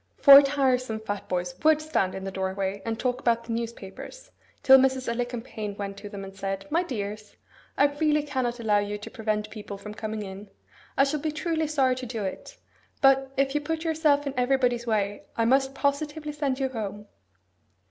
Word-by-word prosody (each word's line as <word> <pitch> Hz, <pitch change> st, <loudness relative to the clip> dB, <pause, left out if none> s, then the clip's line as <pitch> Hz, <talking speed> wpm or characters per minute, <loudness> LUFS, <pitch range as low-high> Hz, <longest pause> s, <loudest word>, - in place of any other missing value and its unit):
Four 280 Hz, -1 st, +10 dB
tiresome 260 Hz, -5 st, +1 dB
fat 205 Hz, -2 st, -5 dB
boys 180 Hz, -1 st, -2 dB
would 310 Hz, 0 st, +5 dB
stand 310 Hz, -12 st, -1 dB
in 190 Hz, -, -6 dB
the 195 Hz, -, -4 dB
doorway, 190 Hz, +1 st, -2 dB
and 225 Hz, -1 st, -3 dB
talk 250 Hz, 0 st, -1 dB
about 235 Hz, -2 st, +1 dB
the 230 Hz, 0 st, -4 dB
newspapers, 230 Hz, -, -7 dB, 0.3 s
till 265 Hz, 0 st, +8 dB
Mrs. 260 Hz, 0 st, +1 dB
Alicumpaine 235 Hz, -3 st, -4 dB
went 200 Hz, -1 st, -4 dB
to 205 Hz, +1 st, -8 dB
them 200 Hz, -1 st, -7 dB
and 195 Hz, 0 st, -10 dB
said, 195 Hz, 0 st, -4 dB
'My 335 Hz, +3 st, +3 dB
dears, 210 Hz, -, -5 dB, 0.4 s
I -, -, +5 dB
really 300 Hz, +1 st, +1 dB
cannot 260 Hz, -4 st, -2 dB
allow 210 Hz, -3 st, +2 dB
you 205 Hz, 0 st, -3 dB
to 210 Hz, -, -10 dB
prevent 215 Hz, -1 st, -2 dB
people 210 Hz, -2 st, -7 dB
from 210 Hz, +1 st, -9 dB
coming 215 Hz, 0 st, -4 dB
in. 195 Hz, +1 st, -9 dB, 0.5 s
I 275 Hz, -, +6 dB
shall 280 Hz, +2 st, 0 dB
be 310 Hz, +1 st, -2 dB
truly 320 Hz, 0 st, -1 dB
sorry 270 Hz, -4 st, +2 dB
to 255 Hz, -, -5 dB
do 225 Hz, -3 st, -4 dB
it; 350 Hz, -, -6 dB, 0.4 s
but, 270 Hz, 0 st, +4 dB
if 270 Hz, 0 st, +2 dB
you 295 Hz, -, 0 dB
put 320 Hz, +2 st, -3 dB
yourself 310 Hz, -3 st, +2 dB
in 280 Hz, -, -3 dB
everybody's 250 Hz, -2 st, +1 dB
way, 205 Hz, -2 st, 0 dB, 0.2 s
I 230 Hz, -, +2 dB
must 270 Hz, +2 st, +2 dB
positively 295 Hz, +2 st, -1 dB
send 285 Hz, -3 st, -1 dB
you 265 Hz, -1 st, 0 dB
home. 210 Hz, -4 st, -5 dB
245 Hz, 190 wpm, -26 LUFS, 210-280 Hz, 0.5 s, Four